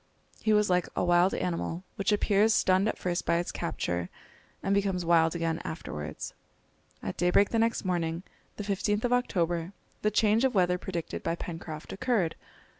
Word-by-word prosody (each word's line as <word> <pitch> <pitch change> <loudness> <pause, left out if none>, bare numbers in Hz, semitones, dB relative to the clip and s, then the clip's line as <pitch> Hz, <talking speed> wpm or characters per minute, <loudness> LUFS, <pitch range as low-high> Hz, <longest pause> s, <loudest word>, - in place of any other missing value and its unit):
He 220 - +2
was 210 -1 +4
like 180 -1 +1
a - - +1
wild 175 +2 +4
animal, 170 0 -2
which 200 +1 0
appears 210 +1 +3
stunned 190 +2 +3
at - - -1
first 175 -1 -1
by - - +2
its 175 - -2
capture, 85 0 -2 0.5
and 195 - +1
becomes 195 -3 +1
wild 165 -1 +4
again 165 -1 -1
afterwards. 75 - -6 0.7
At - - -4
daybreak 180 +3 +3
the 230 - +2
next 230 -2 +1
morning, 170 -1 -1 0.3
the 210 - -4
15th 205 +1 0
of 245 0 +2
October, 175 -7 0 0.3
the 210 - +3
change 215 +2 +3
of 260 -3 +2
weather 180 -1 +3
predicted 175 -3 -4
by 165 - -1
Pencroft 165 -2 -7
occurred. 195 -6 0
180 Hz, 170 wpm, -29 LUFS, 170-210 Hz, 0.7 s, was